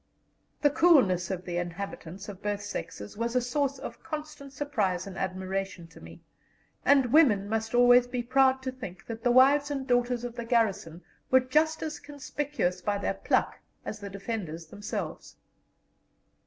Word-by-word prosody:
The 290 - +5
coolness 255 - +4
of 185 -2 -4
the 175 -1 -3
inhabitants, 175 +1 -6
of 200 -2 -9
both 205 0 -2
sexes, 105 - -6
was 235 +2 -2
a - - +5
source 275 +3 -1
of - - -8
constant 305 -3 -7
surprise 215 -11 -1
and 195 -2 -8
admiration 190 -1 -3
to 165 - -15
me, 80 +1 -13 0.6
and 270 -3 +4
women 225 -11 +5
must 225 +2 -2
always 245 0 +6
be 245 -1 -3
proud 265 +1 +3
to 260 - -2
think 220 -7 -9
that 230 -1 -7
the 245 - +3
wives 275 +4 +5
and 275 -2 -3
daughters 245 -1 +1
of 245 -1 -4
the 235 0 -5
garrison 200 -8 0 0.3
were 260 - +6
just 310 +5 +1
as 310 -1 -4
conspicuous 285 -9 -3
by 205 +2 0
their 200 - -1
pluck - - 0 0.3
as 215 - -5
the 200 -1 -7
defenders 195 -5 -5
themselves. 205 +6 -6
235 Hz, 165 wpm, -28 LUFS, 195-270 Hz, 0.6 s, always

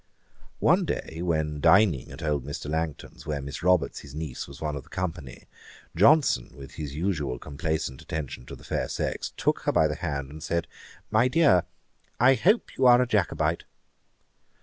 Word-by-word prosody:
One - - +3
day 80 +1 -4
when 80 -4 -1
dining 85 - +4
at - - -9
old 75 -4 0
Mr. 70 +1 -6
Langton's 80 -1 -4
where 75 -2 -2
Miss 70 +1 -6
Roberts, 90 -5 +2
his 70 -1 -12
niece, 75 -4 -5
was 70 0 -11
one 75 -2 -3
of 70 - -5
the - - -22
company, 85 -8 -5 0.5
Johnson, 115 - +4
with 70 -1 -11
his 75 -3 -6
usual 75 -7 -1
complacent 75 -2 -3
attention 70 -5 -6
to - - -8
the - - -16
fair - - -2
sex, - - -3
took - - +1
her - - 0
by 80 - +4
the 75 - -2
hand 70 -5 -4
and 75 +1 -10
said, 85 +1 -1 0.5
'My 125 - +4
dear, 130 - +4 0.5
I 130 +2 +6
hope 205 - +2
you 130 - +5
are 120 0 +8
a 125 - +3
Jacobite.' 105 -7 0
80 Hz, 175 wpm, -26 LUFS, 70-90 Hz, 0.5 s, are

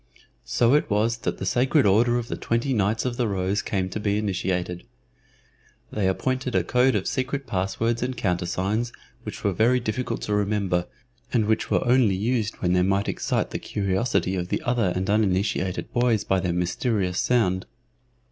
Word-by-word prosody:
So 120 +1 +3
it 150 - +2
was 110 +3 +1
that - - -3
the - - -4
Sacred 130 +2 +2
Order 115 +5 +4
of 120 -1 -3
the - - -3
Twenty 120 +4 -1
Knights 110 +1 +1
of 120 -2 -2
the 120 - +1
Rose 95 0 0
came 95 -2 -1
to 100 - -4
be 105 -1 0
initiated. 90 -3 -2 1.1
They 105 -3 0
appointed 130 +6 -1
a - - +3
code 125 0 +3
of 95 - 0
secret 135 +1 -2
passwords 105 +5 -1
and 125 0 -2
countersigns 95 +5 -1 0.3
which - - -8
were 100 - +1
very 120 +7 +3
difficult 120 0 -3
to 105 - -2
remember, 100 -4 0 0.4
and 115 -4 +2
which 110 +1 0
were - - +1
only 120 -6 +4
used 110 +2 -1
when 90 0 +2
they 90 - +3
might 100 +2 +1
excite - - -1
the - - -3
curiosity 100 0 0
of 90 -1 -2
the - - -2
other 120 -6 +1
and 95 +1 -1
uninitiated 95 -3 0
boys 120 -3 +2
by 95 - +1
their 90 -1 -1
mysterious 90 +2 0
sound. 95 -7 +1
105 Hz, 175 wpm, -25 LUFS, 95-120 Hz, 1.1 s, Order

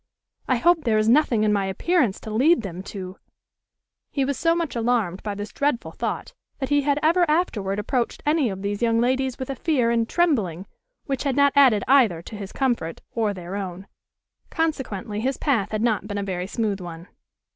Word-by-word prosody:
I 255 - +3
hope 325 +6 +3
there 225 -3 +2
is 215 0 +2
nothing 240 -3 +4
in 210 -1 +3
my 200 -2 0
appearance 245 - +1
to 220 - -7
lead 265 +5 +3
them 185 -2 -6
to" 185 -1 -7 0.9
He 275 -2 0
was 280 +1 -1
so 330 +3 +2
much 335 -5 -2
alarmed 225 -6 0
by 205 -1 -4
this 205 +1 -6
dreadful 280 -4 -1
thought, - - -4 0.2
that 265 -2 -3
he 290 0 +3
had 285 0 +1
ever 340 +3 +4
afterward 215 - 0
approached 235 +3 -2
any 300 -4 +2
of 190 0 -6
these 205 +1 -2
young 230 -1 +2
ladies 260 +1 0
with 260 +1 -4
a - - -4
fear 260 -8 +1
and 230 -1 +1
trembling 215 - +1 0.4
which 270 -2 -2
had 275 -3 0
not 280 -1 +4
added 255 -8 +5
either 230 -12 +4
to 220 - -9
his 200 -2 -7
comfort 240 -12 -1
or 220 -3 0
their 185 -1 -7
own; 190 -1 -5 0.6
consequently 255 - -2
his 260 +4 -1
path 230 -9 0
had 215 0 -2
not 215 -4 0
been 205 -1 -4
a 200 - -1
very 185 -2 -3
smooth 205 -3 -2
one. 170 0 -8
230 Hz, 200 wpm, -24 LUFS, 200-275 Hz, 0.9 s, added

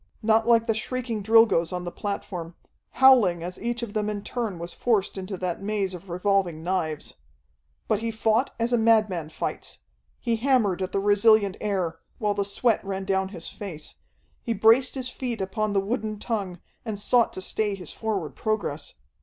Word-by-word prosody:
Not 220 +1 +3
like 230 -1 +5
the 225 - +2
shrieking 235 0 -3
Drilgoes 220 -6 +4
on 180 -1 -3
the 175 - -5
platform, 180 -5 -5 0.4
howling 230 -11 +5
as 180 +1 -6
each 240 +1 -2
of 215 -3 -5
them 210 -1 0
in 205 -1 -4
turn 225 -7 -3
was 170 +1 -7
forced 220 -5 +1
into 190 0 -5
that 180 -1 -3
maze 200 -2 -1
of 180 +1 -10
revolving 180 -2 0
knives. 165 -4 -2 0.7
But - - +1
he 230 +1 -2
fought 225 +3 +1
as 235 +2 0
a 240 - +4
madman 215 -8 +3
fights. - - -4 0.4
He 230 -1 0
hammered 225 -7 +2
at 185 - -2
the 195 - 0
resilient 205 0 +4
air, 185 -6 -1 0.2
while 210 -1 0
the 200 0 0
sweat 220 +3 +1
ran 195 -1 -4
down 190 -1 0
his 170 -4 -8
face, 170 -7 -7 0.5
he 230 - -1
braced 225 +6 +4
his 255 -1 -3
feet 245 -4 -4
upon 205 +2 -1
the 195 - +3
wooden 215 +1 -2
tongue, 200 -5 -3 0.2
and 220 -3 -4
sought 235 +3 +3
to - - -5
stay 205 +2 -1
his 180 -5 -8
forward 200 -9 -3
progress. 205 -9 -3
205 Hz, 180 wpm, -26 LUFS, 185-225 Hz, 0.7 s, like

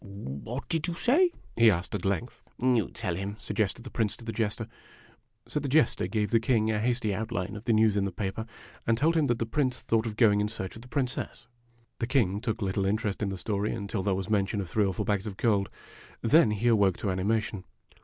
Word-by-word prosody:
" - - -20
What 100 - -6
did 165 -1 -1
you 170 - -2
say? 295 - +4
" - - -27
he 115 0 +6
asked, 90 -3 -1
at 100 -3 -3
length. 100 +6 -2
" - - -40
You 125 -3 +2
tell 95 -7 -2
him,' 100 +3 -4
suo 105 - -6
^ested 110 +2 0
the 125 - -9
Prince 110 -3 -1
to 115 - -12
the 115 - -3
Tester. 110 0 -1
<_><_> - - -9
J - - -29 0.8
So 150 - -1
the 145 - -3
Jester 150 +4 +3
gave 105 -2 -1
the 115 - +5
King 110 -2 +2
a 105 - 0
hasty 115 -2 0
outline 105 -2 -3
of 105 +3 -8
the 115 - +3
news 110 -1 +4
in 100 -1 +1
the 100 - -2
paper, 100 +4 -4 0.4
and 115 0 +3
told 160 +6 +2
him 160 -2 +3
that 120 -4 +1
the 115 - -1
Prince 130 +1 0
thought 115 0 0
of 110 - -4
going 105 -3 +4
in 105 - +1
search 95 -4 -6
of 115 - -10
the 125 - -13
Princess. 125 -3 -3 0.5
The 115 - -1
King 105 -7 +1
took 115 -2 -2
little 95 0 0
interest 105 0 -1
in 105 - 0
the 95 - -4
story 105 +1 -1
until 100 0 -3
there 95 0 +1
was 95 0 -3
mention 105 -1 +1
of 100 - -2
the 85 - -14
three 105 -2 +3
or 95 - 0
four - - -2
bags 105 0 0
of 100 -2 -6
gold. 100 -4 +2 0.5
Then 140 +1 +6
he 105 +3 0
awoke 100 -6 +4
to 100 - -1
animation. 105 +1 -1
110 Hz, 255 wpm, -28 LUFS, 100-120 Hz, 0.8 s, he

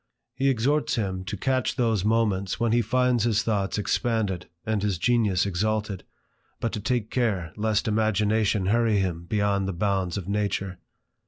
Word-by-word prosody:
He 135 +2 +1
exhorts 135 +5 +1
him 95 -4 -2
to 100 - -4
catch 130 -3 0
those 115 -6 +1
moments 105 -4 +1
when 115 -1 +1
he 120 +1 +3
finds 125 +1 +2
his 115 -3 +2
thoughts 100 -3 -1
expanded 105 -4 -1 0.2
and 110 -2 0
his 100 -3 0
genius 105 -3 +2
exalted, 105 +1 -2 0.5
but 115 - -1
to 110 - -3
take 110 0 -1
care 100 -10 -1
lest 110 +1 0
imagination 110 -1 +1
hurry 115 +1 +2
him 90 -3 -2
beyond 100 0 0
the 95 - -2
bounds 95 0 -1
of 95 -3 -5
nature. 100 -2 -2
105 Hz, 160 wpm, -26 LUFS, 95-115 Hz, 0.5 s, he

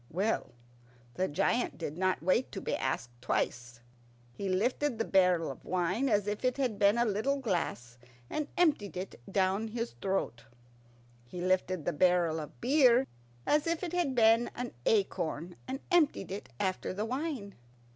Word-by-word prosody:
Well, 190 - -1 0.6
the 185 +6 0
giant 235 +10 0
did 155 -3 -4
not 185 -2 0
wait 190 +8 +2
to 195 - -3
be - - -2
asked 120 -2 -2
twice. 120 -1 -2 0.5
He 195 +9 -4
lifted 245 +7 0
the 225 - 0
barrel 180 -3 +3
of - - -12
wine 185 +9 0
as 205 -3 +2
if 210 +2 -3
it 255 +1 +1
had 250 -7 -1
been 200 +3 +5
a 240 - +3
little 220 +7 0
glass, 170 - -3 0.3
and 305 - -3
emptied 290 - +2
it 185 -8 -6
down 195 +3 +1
his 230 +1 -3
throat. 190 -11 -2 0.8
He 180 - -7
lifted 185 -2 0
the 175 - 0
barrel 175 0 +3
of 150 - -9
beer 255 -1 +5 0.4
as 300 +2 +2
if 335 +2 -1
it 350 -1 -3
had 340 -7 0
been 230 0 +5
an 245 0 -4 0.2
acorn, 175 -5 0
and 265 +1 -3
emptied 325 - +2
it 200 - -6
after 185 0 -1
the 210 +2 -1
wine. 255 -5 -3
200 Hz, 165 wpm, -31 LUFS, 180-250 Hz, 0.8 s, been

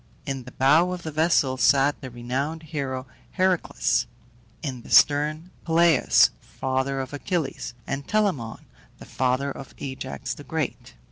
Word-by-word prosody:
In 135 -3 -4
the 125 - -10
bow 155 +7 +4
of 180 -1 -6
the 155 - -4
vessel 150 -4 +2
sat 140 +2 +3
the 130 - -6
renowned 130 +7 -3
hero 135 -5 -4 0.3
Heracles; 185 - +1 0.6
in 130 -5 -4
the - - -14
stern, 150 +4 +4
Peleus 165 -3 +4
(father 130 +1 -2
of 130 +1 -5
Achilles) 145 -5 -3
and 140 0 -4
Telamon 190 - -1 0.3
(the - - -12
father 130 +2 0
of 135 -1 -10
Ajax 130 -2 -5
the - - -11
Great). - - -4
140 Hz, 140 wpm, -25 LUFS, 130-160 Hz, 0.6 s, bow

